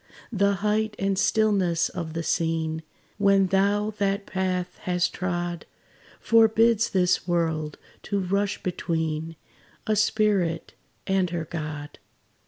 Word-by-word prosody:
The 200 -2 +2
height 215 0 +1
and 195 0 0
stillness 190 -5 +2
of 165 -3 -5
the 165 0 -3
scene, 160 0 -1 0.4
When 195 -1 +4
thou 200 +3 +1
that 200 0 0
path 185 -2 -2
hast 180 -1 0
trod, 175 -1 -3 0.5
Forbids 225 0 +4
this 180 -1 +1
world 160 -3 -1 0.2
to 200 - -2
rush 200 +2 -1
between 160 -2 -2 0.5
A 215 - +1
spirit 205 -5 +1 0.3
and 190 -2 +1
her 165 -1 -3
God. 150 -2 -6
185 Hz, 115 wpm, -25 LUFS, 165-200 Hz, 0.5 s, When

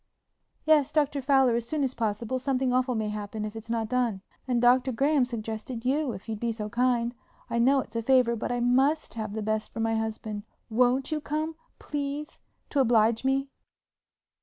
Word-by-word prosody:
"Yes, 305 -3 +4
Dr. 290 -2 +1
Fowler, 265 -3 +4
as 235 0 -2
soon 300 +2 -1
as 260 -1 0
possible; 230 +2 -2
something 260 -1 0
awful 255 0 +1
may 215 -1 -1
happen 210 0 -4
if 210 +1 -6
it's 225 +1 -9
not 225 -1 -1
done. 235 -5 0 0.2
And 245 -2 +1
Dr. 250 +2 +4
Graham 275 +2 +2
suggested 230 0 -5
you 280 +1 +1
if 190 +2 -10
you'd 220 -2 -4
be 235 0 -1
so 215 -2 -5
kind. 240 0 +1 0.4
I 235 - +1
know 265 +3 +4
it's - - -12
a 230 - 0
favor 250 -1 +3
but 230 - -3
I 245 0 -1
must 265 +6 +2
have 215 -2 -4
the 220 0 -3
best 215 0 -1
for - - -7
my 225 0 +1
husband. 220 -1 -3 0.3
Won't 250 +5 +2
you 305 -1 -1
come? 310 +2 -2 0.2
Please, 290 +1 -4 0.3
to 285 - +1
oblige 225 -2 +3
me." 270 +1 +1
245 Hz, 190 wpm, -27 LUFS, 225-270 Hz, 0.4 s, Yes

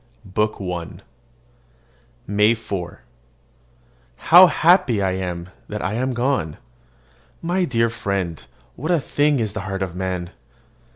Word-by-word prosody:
BOOK 105 +3 -1
I 90 -3 -5 1.3
MAY 105 +3 +3
4. 95 -6 -6 1.1
How 180 - +8
happy 170 - +3
I 95 -1 +1
am 90 -2 -4 0.2
that 105 0 -5
I 95 - -1
am 130 +3 -1
gone! 120 - -1 0.9
My 180 +2 +1
dear 115 -5 +1
friend, 100 -7 -3 0.3
what 155 +6 -5
a 175 -2 +3
thing 145 +1 +1
is 110 -3 -2
the 110 - -4
heart 95 0 -3
of 90 -2 -5
man! 90 -1 -3
105 Hz, 125 wpm, -21 LUFS, 95-130 Hz, 1.3 s, How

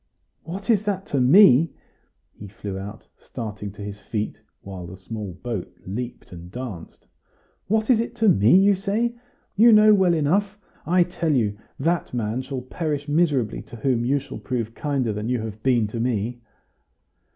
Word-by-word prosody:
"What 195 +7 -3
is 210 -1 +1
it 195 -2 -1
to 140 - -1
me?" 160 +1 +6 0.6
he 100 - -10
flew 100 -1 -7
out, 100 +3 -9
starting 105 -4 -6
to 100 - -9
his 100 0 -7
feet, 105 0 -4 0.2
while 95 -3 -8
the 90 +2 -10
small 100 0 -6
boat 115 -7 -4
leaped 120 +6 -6
and 85 0 -10
danced; 115 -9 -8 0.6
"what 220 +1 +1
is 230 - +4
it 230 - -3
to 225 - +2
me, 115 - +6
you 200 +1 +5
say? 210 +5 -1 0.4
You 230 +4 +7
know 215 0 +7
well 185 -4 +4
enough! 195 +7 +1 0.3
I 180 +1 +4
tell 165 -3 -1
you, 105 -5 +1 0.2
that 165 -2 -1
man 115 +1 -1
shall 130 -1 -5
perish 150 +1 -3
miserably 145 -7 +1
to - - -12
whom 120 0 0
you 135 +4 +2
shall 140 +1 -7
prove 115 -3 -3
kinder 135 -5 -1
than 105 +3 -4
you 125 -1 0
have 110 -1 -7
been 120 -3 +2
to 115 - -5
me!" 120 0 -1
125 Hz, 175 wpm, -23 LUFS, 110-175 Hz, 0.6 s, You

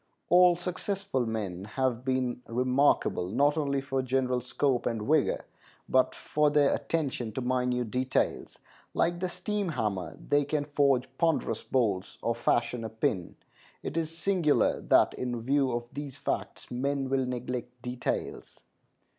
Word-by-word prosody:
All 180 0 +7
successful 180 - -2
men 100 -5 -3
have 125 +2 -1
been 130 -2 -1
remarkable, 125 -6 +2
not 140 +7 +3
only 140 -3 0
for 135 -1 -1
general 130 -1 0
scope 130 +1 0
and 115 -2 -2
vigor, 150 +5 +2 0.4
but 130 0 +3
for 150 0 +1
their 145 -1 +4
attention 140 -5 -2
to 130 - -3
minute 125 -2 0
details. 130 +1 -1 0.4
Like 175 +1 +1
the 185 0 -1
steam 205 0 -2
hammer, 105 - -2
they 145 0 +1
can 145 0 -1
forge 140 -3 +2
ponderous 160 -9 +1
bolts 105 -7 0
or 115 - +1
fashion 120 0 0
a 110 - -4
pin. 105 -5 -2 0.5
It - - -4
is 165 -2 0
singular 175 -5 +2
that - - +4
in 120 -2 -3
view 135 +1 +2
of 120 0 -1
these 145 -1 -6
facts - - -4
men 135 +2 -1
will 130 -1 +1
neglect 125 0 -4
details. 125 0 -4
130 Hz, 145 wpm, -29 LUFS, 120-145 Hz, 0.5 s, All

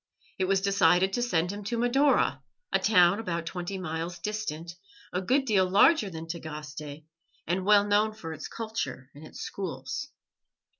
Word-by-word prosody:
It 190 - +2
was 195 0 +2
decided 190 -1 +3
to 240 - 0
send 175 -7 +1
him 205 0 -7
to 235 +3 -2
Madaura, 265 +5 +2 0.3
a - - +4
town 180 -2 +4
about 170 -6 -3
twenty 180 +2 -4
miles 170 -1 -4
distant, 170 -4 -4 0.4
a 180 - 0
good 265 +8 +2
deal 190 -6 +2
larger 205 - +5
than 165 -2 -7
Tagaste, 150 -2 -7 0.4
and 185 +3 -1
well 205 0 +6
known 210 +1 +2
for 165 -6 -7
its - - -7
culture 220 - -5
and 145 - -13
its - - -10
schools. 135 -9 -5
185 Hz, 160 wpm, -28 LUFS, 165-210 Hz, 0.4 s, well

